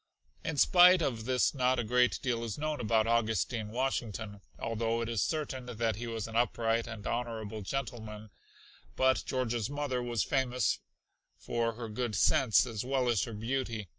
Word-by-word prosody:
In 160 -2 -3
spite 180 +3 +7
of 115 -6 -2
this 130 -1 +2
not 130 -2 +2
a 120 - 0
great 125 +2 +2
deal 120 -3 -1
is 115 -3 -4
known 155 0 -2
about 110 -1 +2
Augustine 115 -1 0
Washington, 110 -4 -3 0.2
although 115 0 -1
it 115 - -2
is 115 -4 0
certain 135 -5 -2
that 115 -3 -1
he 120 +1 -5
was 115 -2 -4
an 115 - -8
upright 115 -1 +1
and 110 -3 -8
honorable 110 -3 -3
gentleman, 110 -3 -5 0.6
but 130 0 +3
George's 120 -3 -1
mother 145 -3 -2
was 120 -3 -1
famous 125 - 0 0.6
for 115 -1 -1
her 115 0 -6
good 110 0 -3
sense 130 - +4
as 115 -2 -4
well 130 0 0
as 115 -5 +2
her 115 - -7
beauty. 115 -2 -3
120 Hz, 165 wpm, -31 LUFS, 110-130 Hz, 0.6 s, spite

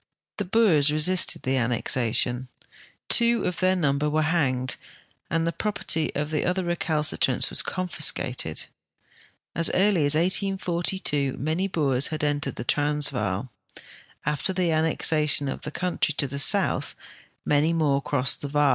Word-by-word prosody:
The 205 - -2
Boers 180 -8 +3
resisted 160 +5 +3
the 130 +1 0
annexation; 120 +1 +1 0.6
two 235 0 +3
of 180 - -3
their 185 0 +2
number 150 -3 0
were 155 +1 +1
hanged 135 -6 0 0.5
and 165 +1 0
the 170 - -1
])i'operty 195 -7 -2
of 150 +2 -3
other 180 +5 0
recalcitrants 155 -6 0
was - - +3
confiscated. 140 - -2 0.9
As 170 0 +2
early 190 -4 +3
as 145 - +2
1842 175 -5 0
many 160 +8 -1
Boers 140 -7 +1
had 155 -1 -5
entered 145 -2 -1
the - - -5
Transvaal. 130 -7 0 0.7
After 150 +5 -1
the 180 -2 0
annex 160 0 +1
ation 150 -2 +3
of 135 - -5
the - - -5
country 170 -2 -2
to - - +1
the 140 +1 -6
soutli, 140 - +2 0.5
many 150 +2 +2
more 150 -4 +1
crossed 135 -2 0
the 145 - -4
Vaal. 145 0 +2
150 Hz, 140 wpm, -25 LUFS, 140-175 Hz, 0.9 s, Boers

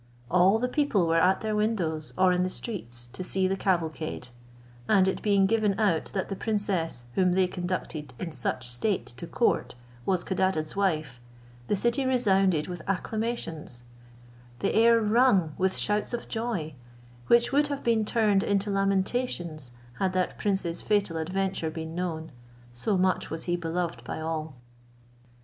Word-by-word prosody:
All 185 +4 +5
the 250 +2 0
people 250 - +1
were 165 0 +3
at 185 +2 +3
their 215 -1 -1
windows, 180 -8 -1
or 185 0 +5
in 180 - +1
the 185 - +1
streets, 120 - -6
to 185 - -5
see 190 +1 +1
the 190 - 0
cavalcade; 165 -8 -2 0.6
and 195 -3 +5
it 190 - -1
being 200 -2 +3
given 210 -1 +1
out 195 -7 +2
that 190 - -1
the 195 - -4
princess, 190 - -1
whom 180 +2 +3
they 185 0 +3
conducted 175 -6 -4
in 170 - -5
such 125 -2 -2
state 175 - -1
to 130 +8 -9
court, 235 - 0 0.3
was 185 +2 +1
Codadad's 185 -4 0
wife, 155 -10 -1 0.5
the - - +2
city 235 +6 +1
resounded 195 - +2
with 180 -2 -6
acclamations, 195 - -3 0.7
the - - -1
air 230 +1 +5
rung 215 - +3
with 190 0 +1
shouts 210 +3 0
of 235 - -7
joy, 220 -10 -3 0.5
which 235 0 +4
would 290 +1 +3
have 285 -1 -4
been 230 -2 +2
turned 210 -3 +2
into 200 0 0
lamentations 195 - -1 0.3
had 190 -1 +1
that 185 -1 0
prince's 190 -5 -1
fatal 205 -5 +1
adventure 185 0 -1
been 160 0 -6
known; 165 -3 -3 0.4
so 190 - 0
much 185 0 +1
was 160 - -4
he 175 - 0
beloved 170 0 -3
by - - -5
all. 160 -2 -4
185 Hz, 160 wpm, -27 LUFS, 165-210 Hz, 0.7 s, All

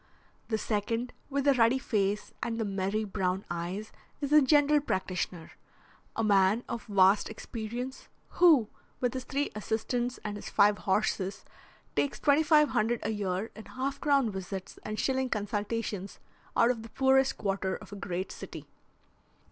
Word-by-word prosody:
The 220 - 0
second, 230 +3 -2 0.2
with 280 0 0
the 280 - +6
ruddy 235 0 +4
face 210 -6 -1
and 230 -1 -2
the 225 - 0
merry 195 +2 -1
brown 190 -2 -1
eyes, 175 +5 -4 0.3
is 285 0 -2
a 300 - +8
general 295 +1 +5
practitioner, 185 - -3 0.6
a 225 - 0
man 200 +2 +4
of 235 - -5
vast 195 0 +4
experience, 235 +4 -6 0.2
who, 315 -11 +5 0.3
with 250 0 0
his 260 -1 -4
three 285 +1 -1
assistants 240 +4 -2
and 210 -1 -4
his - - -7
five 205 0 +4
horses, 195 -1 0 0.5
takes 285 - 0
twenty 290 +1 +4
five 300 -2 +5
hundred 230 +1 +1
a 220 - -1
year 200 0 -2
in 220 - -10
half 270 +2 -4
crown 275 -6 +3
visits 190 0 -6
and 215 0 -5
shilling 265 -1 0
consultations 205 -2 -3 0.4
out 235 - +5
of 235 -3 -4
the 225 - -10
poorest 265 +2 +3
quarter 195 -2 -1
of - - -11
a - - -6
great 185 -1 -4
city. - - -8
220 Hz, 155 wpm, -30 LUFS, 200-260 Hz, 0.6 s, a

